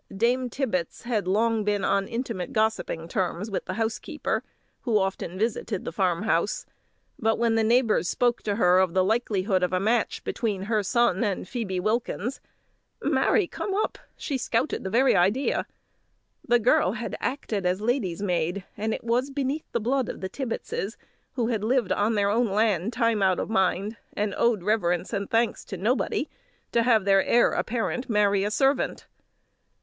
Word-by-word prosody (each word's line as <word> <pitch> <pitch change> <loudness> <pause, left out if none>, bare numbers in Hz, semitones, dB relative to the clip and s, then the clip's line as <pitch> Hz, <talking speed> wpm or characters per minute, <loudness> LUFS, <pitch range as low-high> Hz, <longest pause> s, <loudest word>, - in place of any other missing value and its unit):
Dame 245 +3 +1
Tibbets 220 - -2
had 225 -5 -1
long 220 +3 +2
been 205 -1 0
on 195 0 +1
intimate 230 -6 -4
gossiping 215 -7 0
terms 185 +3 -2
with 195 - -3
the 185 - -4
housekeeper, 225 0 -2 0.4
who 230 -4 +1
often 190 -2 -2
visited 215 -2 -2
the - - -3
farm 180 +1 0
house; 205 -2 0 0.5
but 225 -3 +2
when 230 -1 +2
the 225 0 +2
neighbours 225 -5 +3
spoke 245 -1 +1
to 205 -2 -1
her 180 -4 +4
of 185 -2 +1
the 185 - +4
likelihood 200 -3 +1
of 180 -1 +1
a 185 - +1
match 220 +4 0
between 205 -5 -2
her 215 +1 +1
son 235 0 +2
and 200 -4 -2
Phoebe 200 -6 -3
Wilkins, 230 +4 -2 0.6
"Marry 415 - +3
come 385 +3 -4
up!" 425 - -1 0.2
she 275 -4 -3
scouted 245 +4 -1
the 190 - -3
very 255 +6 +4
idea. 200 +10 +2 0.8
The 240 0 +5
girl 220 -4 +3
had 235 0 -4
acted 215 -8 -2
as 180 +1 0
lady's 210 -6 -1
maid, 180 0 -1
and 220 +1 -1
it - - -9
was 240 +4 +1
beneath 280 +2 -3
the 235 - 0
blood 250 +3 0
of - - -6
the 190 - -4
Tibbetses, 230 -3 -4 0.4
who 240 -3 -1
had 220 -4 -1
lived 240 -2 +1
on 215 +2 +1
their 200 -1 +2
own 235 +3 +2
lands 210 0 +1
time 230 -4 +2
out 190 -2 +3
of - - -3
mind, 195 +2 +1 0.2
and 210 0 -1
owed 230 -6 +2
reverence 180 -3 0
and 200 -1 -2
thanks 230 +1 +1
to 195 - -6
nobody, 245 - 0 0.4
to 235 - +3
have 225 -4 +3
the 200 - +3
heir 240 - +4
apparent 245 +2 -2
marry 205 -2 +3
a 205 - 0
servant! 270 +5 +1
220 Hz, 175 wpm, -26 LUFS, 195-235 Hz, 0.8 s, The